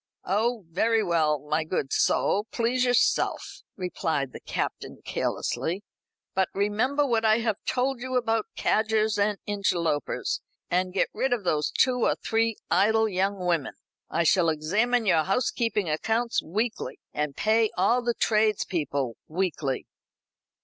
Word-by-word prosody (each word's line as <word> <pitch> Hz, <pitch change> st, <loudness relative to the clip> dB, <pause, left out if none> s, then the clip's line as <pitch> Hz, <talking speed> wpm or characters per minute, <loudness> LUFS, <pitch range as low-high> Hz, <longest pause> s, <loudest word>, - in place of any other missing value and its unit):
"Oh, 220 Hz, +2 st, 0 dB
very 220 Hz, +5 st, +2 dB
well, 160 Hz, -5 st, +2 dB
my 150 Hz, +3 st, -1 dB
good 155 Hz, -4 st, -2 dB
soul; 205 Hz, +3 st, +2 dB
please 245 Hz, +2 st, +1 dB
yourself," 245 Hz, -1 st, +1 dB, 0.2 s
replied 160 Hz, -7 st, -2 dB
the -, -, -8 dB
Captain -, -, -4 dB
carelessly; 185 Hz, +5 st, -2 dB, 0.5 s
"but 190 Hz, 0 st, +1 dB
remember 220 Hz, +9 st, +1 dB
what 230 Hz, -4 st, +1 dB
I 220 Hz, 0 st, +5 dB
have 225 Hz, -3 st, -1 dB
told 255 Hz, 0 st, 0 dB
you 255 Hz, +1 st, -3 dB
about 225 Hz, -3 st, +1 dB
cadgers 220 Hz, -1 st, +1 dB
and 205 Hz, 0 st, +2 dB
interlopers; 175 Hz, -7 st, -1 dB, 0.3 s
and 185 Hz, +1 st, +1 dB
get 190 Hz, -, +1 dB
rid 265 Hz, -1 st, 0 dB
of 220 Hz, -6 st, -3 dB, 0.3 s
two 255 Hz, -1 st, +3 dB
or -, -, +2 dB
three 225 Hz, 0 st, 0 dB
of -, -, -25 dB
those -, -, -32 dB
idle 220 Hz, +2 st, +3 dB
young 195 Hz, -1 st, -1 dB
women. 170 Hz, -6 st, 0 dB, 0.3 s
I 170 Hz, -, +1 dB
shall 170 Hz, +1 st, +4 dB
examine 210 Hz, +10 st, +1 dB
your 170 Hz, -5 st, +4 dB
housekeeping 215 Hz, -1 st, 0 dB
accounts 225 Hz, +10 st, 0 dB
weekly, 215 Hz, +7 st, -3 dB
and 150 Hz, -2 st, -2 dB
pay 220 Hz, 0 st, +3 dB
all 230 Hz, +7 st, +3 dB
the 240 Hz, -1 st, -1 dB
tradespeople 175 Hz, -, 0 dB
weekly." 155 Hz, -6 st, -2 dB
205 Hz, 140 wpm, -26 LUFS, 170-230 Hz, 0.5 s, I